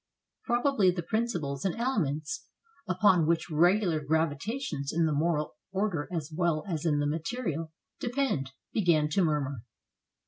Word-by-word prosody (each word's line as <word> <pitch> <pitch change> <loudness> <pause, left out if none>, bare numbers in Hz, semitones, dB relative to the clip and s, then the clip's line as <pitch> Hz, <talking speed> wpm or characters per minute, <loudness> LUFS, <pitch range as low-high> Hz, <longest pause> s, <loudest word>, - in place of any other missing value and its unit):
Probably 240 -5 +3
the 175 -1 -1
principles 170 - -1
and 190 - 0
elements 230 - -1 0.4
upon 185 -3 +4
which 165 0 +1
regular 175 +1 +3
gravitations 160 - -1
in 165 +1 +2
the 155 - +1
moral 155 0 0 0.2
order 190 -6 -1
as 160 -3 -4
well 170 -3 +1
as 165 -3 -2
in 150 -2 +2
the 145 - +1
material 165 - -2 0.3
depend, 245 - -1 0.2
began 165 -7 +3
to 185 +5 +2
murmur. 140 -6 0
165 Hz, 135 wpm, -29 LUFS, 150-205 Hz, 0.4 s, upon